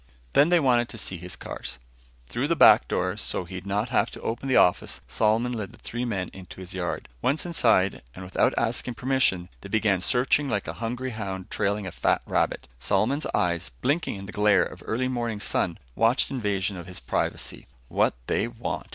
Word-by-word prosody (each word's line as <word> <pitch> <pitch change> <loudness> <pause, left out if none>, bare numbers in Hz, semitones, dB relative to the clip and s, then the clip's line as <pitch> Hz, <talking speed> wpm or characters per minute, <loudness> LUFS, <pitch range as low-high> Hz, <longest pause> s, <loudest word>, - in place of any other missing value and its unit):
Then 145 +4 +6
they 175 -1 +5
wanted 120 -5 +3
to 115 - -7
see 95 -3 -2
his 90 +2 -6
cars. - - -7 0.5
Through 120 - -2
the 170 - +2
back - - +7
door, - - -1
so - - -2
he'd 90 +2 -8
not 105 +4 0
have 120 - +2
to - - -10
open 120 +4 -3
the 130 - +3
office, 90 - +3
Solomon 115 +3 +2
led 110 -3 -4
the - - -15
three 120 +2 -4
men 95 -6 -2
into 95 -1 -11
his 95 0 -7
yard. 90 -2 -3
Once 145 +6 +1
inside, 115 - +2
and 95 - -8
without 90 - +2
asking 120 +1 -1
permission, 125 -10 +1
they 100 - -9
began 100 -3 +2
searching 130 +7 +2
like 105 -4 -1
a - - -3
hungry 125 +3 -2
hound 95 -4 -5
trailing 100 0 0
a 95 - -4
fat - - +1
rabbit. - - 0
Solomon's 110 - +1
eyes, 85 -5 0
blinking 145 +1 0
in 100 0 -7
the 100 - -8
glare 105 0 +4
of - - -8
early 125 +3 0
morning 120 -4 -2
sun, 95 -3 0 0.2
watched 115 - +2
invasion 100 -6 -1
of 85 0 -8
his 90 - -7
privacy. - - -3 0.2
"What - - +2
they 105 - +1
want?" 120 0 -5
110 Hz, 195 wpm, -26 LUFS, 95-125 Hz, 0.5 s, back